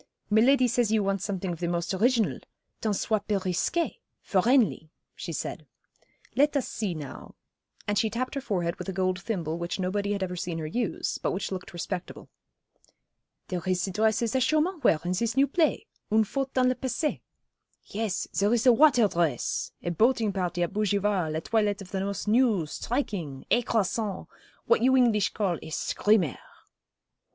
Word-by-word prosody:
'Miladi 250 +4 +5
says 240 -2 +1
you 220 -2 +3
want 195 -1 0
something 190 -2 -3
of 165 - -8
the 175 - -1
most 170 +2 -1
original 230 +3 +2 0.4
tant 215 -2 0
soit 210 +1 -1
peu 210 -2 +2
risqué 190 - -1 0.3
for 190 -3 +2
'Enley,' 215 - +2 0.2
she - - -6
said. - - -5 0.7
'Let 290 +1 +3
us 270 - -1
see 200 -6 -3
now,' 145 -4 -9 0.5
and 205 0 +1
she 220 - +1
tapped 245 +4 -3
her 275 - -3
forehead 175 -8 -2
with - - -6
a - - -3
gold 185 0 0
thimble 170 -7 -3
which 170 +3 -3
nobody 200 +2 -1
had 200 -1 -2
ever 180 -1 -3
seen 175 -1 -3
her 160 - -4
use, 220 +8 -2
but - - -1
which 190 +2 -3
looked 185 -1 -5
respectable. 175 +1 -6 1.2
'There 180 -2 -2
is 180 -1 +1
ze 195 - -2
dresses 220 +3 +1
that 260 - +1
Chaumont 310 +6 +1
wear 155 - +4
in 180 - 0
zis 230 +6 -1
new 275 - +6
play, 320 +7 +1 0.3
Une 220 +1 +5
Faute 270 +5 -3
dans 255 -1 +4
le 255 - +3
Passé. 260 +4 -2 0.6
Yes, 210 -2 -2
zere 205 +4 +2
is 235 - +1
the 250 - +7
watare 250 -4 +5
dress 170 -9 -1
a 175 - -1
boating 220 +2 +2
party 180 -2 -1
at 175 - -3
Bougival, 200 -5 0
a 160 - -1
toilet 210 +1 +1
of 195 -2 -10
the 190 -1 -2
most 200 +1 -3
new, 220 -6 +3
striking, 175 - -3
écrasant, 220 -4 0 0.4
what 470 - +3
you 260 +1 +4
English 225 -5 +3
call 190 -5 0
a - - -9
"screamer."' 185 - +1
205 Hz, 180 wpm, -27 LUFS, 180-240 Hz, 1.2 s, the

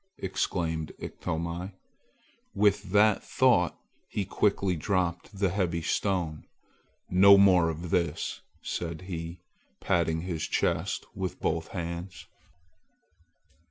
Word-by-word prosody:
exclaimed 85 -4 -2
Iktomi. 85 +4 -4 0.8
With 105 0 +2
that 105 0 +4
thought 115 -11 +3 0.3
he 100 - -2
quickly 100 -1 +1
dropped 90 +3 -1
the 95 -1 +2
heavy 85 -3 -1
stone. 85 -5 -1 0.6
"No 100 +2 +8
more 90 -4 +5
of 80 +1 -5
this!" 85 -1 -1 0.2
said 85 -1 -4
he, 85 -1 -6 0.4
patting 80 -2 +1
his 85 -3 -3
chest - - 0
with 95 -1 -4
both 80 0 -1
hands. 85 +1 -6
90 Hz, 100 wpm, -28 LUFS, 85-95 Hz, 0.8 s, No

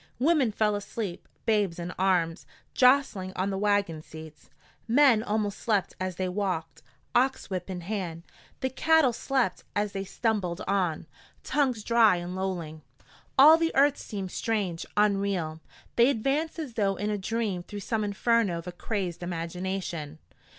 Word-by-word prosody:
Women 280 -3 +3
fell 210 0 +1
asleep, 205 -2 -5 0.2
babes 205 -6 +1
in 175 0 -5
arms, 180 -3 0 0.3
jostling 250 -8 +3
on 190 +2 -1
the 195 - -2
wagon 205 -6 +1
seats; 155 -1 -12 0.4
men 245 -2 +5
almost 210 -2 -1
slept 210 -5 0
as 185 -1 -3
they 185 +1 -2
walked, 185 -3 -3 0.3
ox 255 -3 +1
whip 185 0 -3
in 180 -2 -4
hand; 175 -3 -4 0.4
the 260 - -1
cattle 320 -2 +3
slept 245 -5 -1
as 205 0 0
they 195 -1 -3
stumbled 195 -4 -1
on, 185 -6 0 0.4
tongues 260 -7 0
dry 230 -4 +5
and 175 +1 -5
lolling. 175 -5 -4 0.6
All 305 +4 +9
the 330 0 0
earth 280 +1 +4
seemed 195 -4 -5
strange, 200 -7 -2
unreal. 195 -6 +1 0.4
They 235 +2 +6
advanced 280 +7 0
as 300 -7 -5
though 200 -3 +1
in 205 +3 -2
a 210 - -1
dream 210 -2 -2
through 205 +3 -8
some 220 +2 -1
inferno 205 -2 +1
of 170 - -7
a 180 - -5
crazed 180 -2 -4
imagination. 175 -2 -4
200 Hz, 150 wpm, -28 LUFS, 180-230 Hz, 0.6 s, All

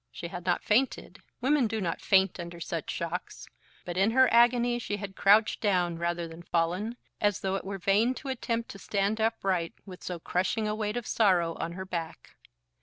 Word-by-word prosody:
She 170 - -7
had 180 0 -7
not 175 - +1
fainted. 250 +5 0 0.2
Women 270 -1 +3
do 220 0 -2
not 175 -4 -2
faint 190 -1 +3
under 170 0 -7
such 165 - -4
shocks. - - -4 0.4
But 175 0 -5
in 195 +3 +4
her 260 +3 +5
agony 240 0 +4
she 205 -3 -3
had 200 -1 -7
crouched 210 +2 +4
down 180 -5 +1
rather 170 0 -1
than 165 +1 -10
fallen, 175 +8 -1 0.2
as 205 -2 +1
though 190 0 -1
it 195 - -2
were 195 0 -5
vain 205 +7 +2
to 275 - -7
attempt 235 -3 -2
to 195 - -9
stand 200 +3 -1
upright 190 -6 0
with 185 -3 -10
so 180 - -4
crushing 190 +6 -1
a 210 - 0
weight 215 +1 -2
of 240 - -4
sorrow 180 -6 +2
on 170 - -3
her 190 +1 -6
back. 170 -3 -6
195 Hz, 195 wpm, -29 LUFS, 175-225 Hz, 0.4 s, her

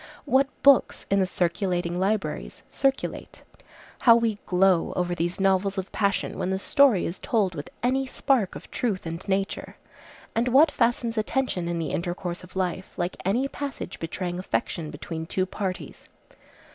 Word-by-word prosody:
What 275 -1 +3 0.2
books 275 -2 +5
in 200 - +4
the 190 - +2
circulating 175 -1 -1
libraries 185 - -2
circulate? 270 0 -1 0.6
How 230 -2 +7
we 230 -3 +1
glow 185 -1 +3
over 175 -1 0
these 175 +1 -2
novels 195 +1 +2
of 190 0 -4
passion, 200 -1 0
when 180 - -1
the 190 - 0
story 255 - +4
is 170 - -4
told 215 -8 +1
with 145 -3 -6
any 265 +2 +1
spark 255 -6 +1
of - - -10
truth 210 -8 -1
and 165 +2 -5
nature! 195 0 -2 0.6
And 230 +2 +1
what 285 +5 +6
fastens 235 -1 +1
attention, 215 -6 -1
in 170 0 -1
the 160 -3 -2
intercourse 175 +1 -3
of 180 +1 -14
life, 185 0 -2
like 175 0 -2
any 240 +8 +2
passage 275 -9 -6
betraying 175 +2 -4
affection 170 -3 -2
between 160 +2 -6
two 185 +1 0
parties? 190 -1 -5
190 Hz, 160 wpm, -26 LUFS, 175-235 Hz, 0.6 s, How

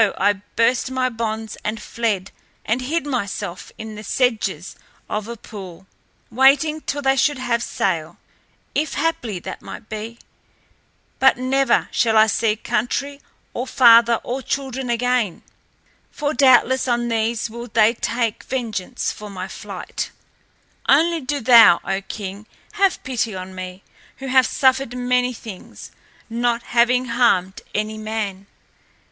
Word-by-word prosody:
I 205 -1 +2
burst 235 +2 +2
my 260 -1 0
bonds 225 -2 -4
and 215 +1 -3
fled 210 -4 -2 0.3
and 235 +4 0
hid 295 +4 -1
myself 205 -8 -4
in 220 0 -7
the 210 0 -9
sedges 210 - -1 0.3
of 210 0 -3
a 235 0 -6
pool, 190 -5 -10 0.5
waiting 275 +5 +4
till 285 -1 -3
they 270 0 +3
should 285 +1 +2
have 235 -2 -1
set - - -4
sail, 165 -5 -1 0.6
if 305 0 -1
haply 245 - -1
that - - -7
might 215 - -10
be. 220 +2 -6 1.0
But 265 -2 +5
never 260 0 +2
shall 225 -2 +2
I 215 - +7
see 220 0 +1
country 275 +6 -2 0.3
or 250 +2 -3
father 235 -2 +6
or 255 +2 -3
children 265 -1 -3
again. 240 -5 0 0.7
For 295 0 -2
doubtless 260 -1 +4
on 240 -1 +1
these 230 0 0
will 235 +2 -8
they 220 0 +4
take 230 -2 -2
vengeance 235 -3 -3
for 210 0 -9
my 185 -1 -6
flight. - - -6 0.8
Only 330 +3 +4
do 285 +2 -2
thou, 230 -7 +8
O 195 0 -1
King, 200 +1 -7 0.2
have 395 -3 +1
pity 235 -5 -2
on 185 0 -7
me, 185 0 -8 0.3
who 270 - -8
have 260 0 +5
suffered 260 -2 +1
many 250 0 +1
things, 220 -5 -10 0.4
not 235 +1 -1
having 245 +1 +4
harmed 230 -6 +1
any 215 +1 -2
man." 210 -3 -4
235 Hz, 140 wpm, -21 LUFS, 215-255 Hz, 1.0 s, thou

